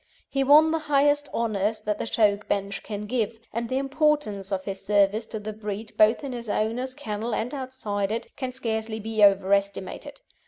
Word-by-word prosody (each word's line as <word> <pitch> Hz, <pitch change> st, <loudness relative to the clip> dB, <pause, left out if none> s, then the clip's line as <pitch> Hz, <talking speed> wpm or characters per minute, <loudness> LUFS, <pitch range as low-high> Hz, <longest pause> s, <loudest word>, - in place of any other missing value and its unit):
He 275 Hz, 0 st, +1 dB
won 300 Hz, +3 st, +7 dB
the 325 Hz, -, +1 dB
highest 290 Hz, 0 st, +3 dB
honours 215 Hz, -1 st, 0 dB
that 210 Hz, -1 st, -2 dB
the -, -, -3 dB
show 210 Hz, -2 st, +3 dB
bench 200 Hz, -1 st, -3 dB
can 205 Hz, -2 st, -5 dB
give, 225 Hz, -1 st, -1 dB
and 230 Hz, +1 st, -2 dB
the 260 Hz, -, 0 dB
importance 275 Hz, -8 st, 0 dB
of 190 Hz, -1 st, -2 dB
his 195 Hz, -1 st, -5 dB
service 205 Hz, +2 st, +2 dB
to 220 Hz, -, -5 dB
the 215 Hz, +1 st, -6 dB
breed 210 Hz, 0 st, -6 dB
both 215 Hz, +6 st, +4 dB
in 275 Hz, -, -4 dB
his 235 Hz, -3 st, -6 dB
owner's 240 Hz, +5 st, -1 dB
kennel 225 Hz, -4 st, -3 dB
and 240 Hz, +5 st, -2 dB
outside 240 Hz, -7 st, -3 dB
it, 230 Hz, +1 st, -4 dB
can 260 Hz, -2 st, -4 dB
scarcely 220 Hz, -3 st, -3 dB
be 220 Hz, 0 st, 0 dB
over 195 Hz, -1 st, +5 dB
estimated. 200 Hz, +8 st, -2 dB
220 Hz, 190 wpm, -26 LUFS, 205-260 Hz, -, won